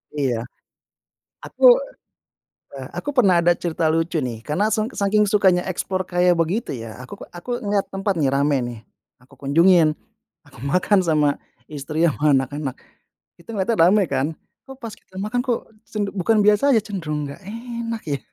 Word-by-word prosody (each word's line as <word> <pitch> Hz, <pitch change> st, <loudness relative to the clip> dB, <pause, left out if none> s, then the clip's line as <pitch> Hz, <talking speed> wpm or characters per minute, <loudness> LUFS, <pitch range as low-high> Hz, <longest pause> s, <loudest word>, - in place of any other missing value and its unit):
Iya. 125 Hz, -5 st, -1 dB, 1.0 s
Aku -, -, -9 dB, 1.2 s
eh, -, -, -7 dB
aku -, -, -4 dB
pernah 195 Hz, -7 st, +5 dB
ada 175 Hz, +1 st, +4 dB
cerita 170 Hz, -1 st, -2 dB
lucu 165 Hz, +1 st, 0 dB
nih. 120 Hz, -5 st, -4 dB
Karena 165 Hz, -, 0 dB
seng 215 Hz, +1 st, 0 dB
saking 205 Hz, 0 st, +2 dB
sukanya 190 Hz, -4 st, +3 dB
explore 185 Hz, +1 st, -2 dB
kayak 180 Hz, 0 st, +3 dB
begitu 170 Hz, +7 st, -1 dB
ya, 115 Hz, -1 st, -8 dB
aku 125 Hz, -, -10 dB
k -, -, -6 dB
aku 175 Hz, +7 st, -11 dB
ngelihat 200 Hz, -1 st, 0 dB
tempat 195 Hz, +1 st, 0 dB
nih, 140 Hz, -3 st, +2 dB
rame 140 Hz, +1 st, +2 dB
nih. 120 Hz, -2 st, -7 dB, 0.4 s
Aku 130 Hz, -, -23 dB
kunjungin, 165 Hz, +3 st, +4 dB, 0.5 s
aku -, -, -17 dB
makan 180 Hz, +7 st, +2 dB
sama 150 Hz, -3 st, +3 dB, 0.4 s
istri, 155 Hz, +2 st, -3 dB
sama 150 Hz, -2 st, +3 dB
anak-anak, 135 Hz, 0 st, -2 dB, 0.7 s
itu 170 Hz, -, -21 dB
ngelihatnya 215 Hz, +2 st, 0 dB
rame 205 Hz, +2 st, +4 dB
kan. 135 Hz, +1 st, +1 dB, 0.4 s
Kok 270 Hz, -, -9 dB
pas 225 Hz, -, -5 dB
kita 185 Hz, -, -17 dB
makan 215 Hz, +6 st, -1 dB
kok, 245 Hz, -2 st, -1 dB, 0.3 s
sen 210 Hz, -, -3 dB
bukan 205 Hz, +2 st, +2 dB
biasa 210 Hz, +6 st, +4 dB
aja, -, -, +4 dB
cenderung 160 Hz, -8 st, -4 dB
nggak 140 Hz, 0 st, -8 dB
enak 230 Hz, 0 st, -5 dB
ya. 145 Hz, -3 st, -2 dB
175 Hz, 165 wpm, -22 LUFS, 145-210 Hz, 1.2 s, pernah